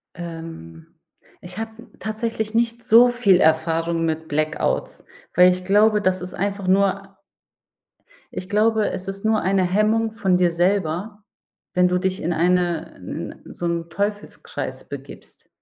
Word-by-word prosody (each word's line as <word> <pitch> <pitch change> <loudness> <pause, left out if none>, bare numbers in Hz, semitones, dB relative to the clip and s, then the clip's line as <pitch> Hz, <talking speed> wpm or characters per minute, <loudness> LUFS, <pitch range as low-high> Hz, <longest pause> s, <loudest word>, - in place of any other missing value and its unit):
Ähm, 165 - -9 0.5
ich 180 +2 -11
habe 225 0 -4 0.3
tatsächlich 220 0 -3
nicht 235 0 0
so 240 +3 +7
viel 210 -7 +3
Erfahrung 165 +1 +2
mit 160 0 -2
Blackouts, 155 +1 -1 0.3
weil 180 +1 +7
ich 180 0 -4
glaube, 210 +2 +4
das 185 -2 +1
ist 180 +1 -7
einfach 200 0 -3
nur 195 +1 +1 1.1
Ich 185 - -7
glaube, 215 +1 +2
es 185 - -6
ist 195 +2 -6
nur 220 0 +2
eine 190 0 +2
Hemmung 215 +4 +1
von 195 -5 +1
dir 180 -1 +3
selber, 190 +3 -1 0.5
wenn 180 -1 +4
du 180 - +1
dich 185 +1 -2
in 170 +2 -1
eine 175 -1 +1
'n 90 - -7
so 175 - -5
'n 170 0 -2
Teufelskreis 205 +4 -4
begibst. - - -11
185 Hz, 140 wpm, -22 LUFS, 170-210 Hz, 1.1 s, so